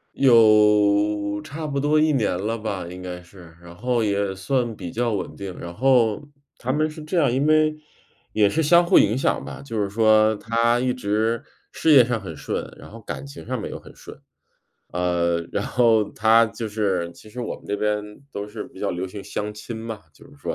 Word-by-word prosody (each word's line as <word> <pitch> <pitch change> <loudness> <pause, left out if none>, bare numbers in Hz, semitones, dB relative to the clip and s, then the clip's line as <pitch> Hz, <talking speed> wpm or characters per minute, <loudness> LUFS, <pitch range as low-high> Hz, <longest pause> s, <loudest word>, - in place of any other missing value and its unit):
有 105 -4 +4
差 155 +1 -6
不 140 -2 -2
多 150 +2 +2
1 155 0 +3
年 110 -9 +1
了 110 +4 -2
吧， 100 -5 -4
应 90 +1 -9
该 90 -1 -6
是， 85 -2 -16
然 85 0 -13
后 120 +3 0
也 100 -2 0
算 120 +3 -1
比 85 -4 -7
较 120 0 -1
稳 100 - -4
定， 95 -2 -7
然 85 0 -7
后 120 -2 +3 0.4
他 130 - -2
们 155 +3 +1
是 155 0 -10
这 165 +4 -3
样， 140 -6 +2
因 140 +4 +1
为 155 0 +3 0.6
也 105 -2 +3
是 160 +10 0
相 170 +3 +5
互 190 - +6
影 110 +4 +3
响 - - 0
吧， - - -8
就 115 -6 -3
是 100 - -1
说 110 0 +4
他 115 +3 +1
一 125 0 0
直 110 0 -1 0.3
事 160 - +1
业 130 -5 +8
上 120 -3 -2
很 95 - -8
顺， - - -3
然 - - -13
后 115 - -11
感 110 - -6
情 140 +1 -10
上 130 -2 -2
面 - - -5
又 - - -7
很 - - -15
顺。 - - -12 0.8
呃， 85 -1 0
然 100 - -1
后 115 -4 +3
他 110 +1 +4
就 110 +1 -6
是 100 -5 -1
其 110 - -16
实 125 - -7
我 120 - -4
们 - - -19
这 105 - -2
边 105 0 0 0.3
都 100 -3 -5
是 105 +1 -7
比 - - -15
较 - - -1
流 90 +2 -3
行 100 +1 -9
相 105 0 -4
亲 115 +2 -8
嘛， 110 -1 -6
就 - - -19
是 145 - -18
说， - - -4
110 Hz, 230 characters per minute, -23 LUFS, 100-125 Hz, 0.8 s, 业